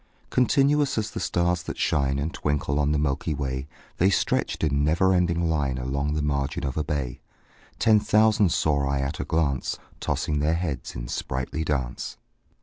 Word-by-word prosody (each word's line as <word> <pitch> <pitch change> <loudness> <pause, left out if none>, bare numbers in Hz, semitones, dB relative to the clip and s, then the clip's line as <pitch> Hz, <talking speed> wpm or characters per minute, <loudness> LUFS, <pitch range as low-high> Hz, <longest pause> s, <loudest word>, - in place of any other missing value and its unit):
Continuous 140 +3 +3
as 110 0 -1
the - - -5
stars 85 0 +1
that - - -6
shine 70 -2 +1
And 75 +4 -2
twinkle 75 -1 -1
on 75 0 +2
the 75 - +2
milky 75 +2 -1
way, 65 -1 -3 0.3
The 95 - +5
stretched 95 - 0
in 70 -2 +2
never 85 +5 +3
ending 85 -2 +2
line 70 -5 0
Along 70 +3 -1
the 75 - -1
margin 70 -1 -1
of 65 - -3
a 75 - 0
bay: 70 -3 -3 0.6
Ten 110 -1 +5
thousand 105 -3 +3
saw 75 -4 +1
I 70 0 0
at 70 +3 -3
a - - -1
glance, 75 -5 0 0.2
Tossing 75 -1 -1
their 75 +3 +2
heads 85 -5 -3
in - - -5
sprightly 65 +6 -3
dance. 70 -5 -3
75 Hz, 175 wpm, -25 LUFS, 70-85 Hz, 0.6 s, The